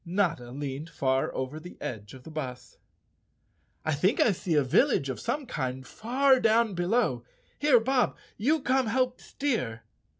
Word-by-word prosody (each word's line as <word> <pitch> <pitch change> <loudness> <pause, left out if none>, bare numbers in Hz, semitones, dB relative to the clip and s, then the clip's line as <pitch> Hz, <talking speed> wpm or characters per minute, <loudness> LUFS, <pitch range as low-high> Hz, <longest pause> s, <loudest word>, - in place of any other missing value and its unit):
Notta 170 -9 0
leaned 140 +3 -5
far 130 -3 0
over 130 +4 -3
the 175 +3 -11
edge 105 -1 -6
of 130 - -13
the 160 - -10
bus. 130 -5 -6 1.1
"I 155 - +1
think 180 +10 +1
I 225 - +5
see 175 -3 -1
a 145 - +4
village 135 +1 +2
of 130 - -4
some 275 +4 -2
kind 130 - -4
far 260 - +2
down 225 -1 +3
below. 175 - +1 0.4
Here, 290 -5 +5
Bob, 250 +2 +1 0.2
you 295 +8 +1
come 260 -2 +2
help 255 +2 0
steer." 210 - -2
175 Hz, 160 wpm, -28 LUFS, -, 1.1 s, I